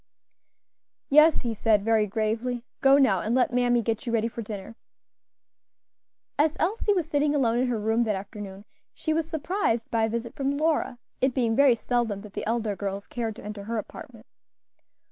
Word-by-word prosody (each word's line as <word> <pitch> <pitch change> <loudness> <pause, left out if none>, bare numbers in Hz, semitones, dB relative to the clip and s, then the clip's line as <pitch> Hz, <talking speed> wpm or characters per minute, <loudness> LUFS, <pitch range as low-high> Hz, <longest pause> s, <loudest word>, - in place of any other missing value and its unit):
"Yes," 305 +3 +6
he 235 -2 -2
said, 210 -1 +2
very 220 -2 +3
gravely. 230 +4 -2 0.2
"Go 275 +1 +6
now 225 -10 +4
and 220 +7 -1
let 250 -1 +2
mammy 245 -1 +2
get 225 +2 -2
you - - -1
ready 230 -1 +1
for 235 0 -6
dinner." 210 0 -7 1.6
As 310 +1 +2
Elsie 415 +4 +1
was 345 -4 -1
sitting 295 -1 +1
alone 240 -4 +2
in 255 - +1
her 240 -3 -1
room 220 +2 +1
that 215 -2 0
afternoon 200 0 -8 0.3
she 315 - -1
was 320 0 -1
surprised 315 - -1
by 225 -1 +2
a - - -2
visit 235 +1 -4
from 275 +1 -1
Lora; 310 -5 0 0.2
it 260 -1 +1
being 235 -4 +1
very 275 -2 +5
seldom 230 -4 -1
that 210 -1 -12
the - - -4
elder 225 -2 -1
girls 200 0 -4
cared 225 -3 -4
to - - -11
enter 210 -1 -7
her 230 +1 -3
apartment. 215 - -8
235 Hz, 185 wpm, -26 LUFS, 215-275 Hz, 1.6 s, Yes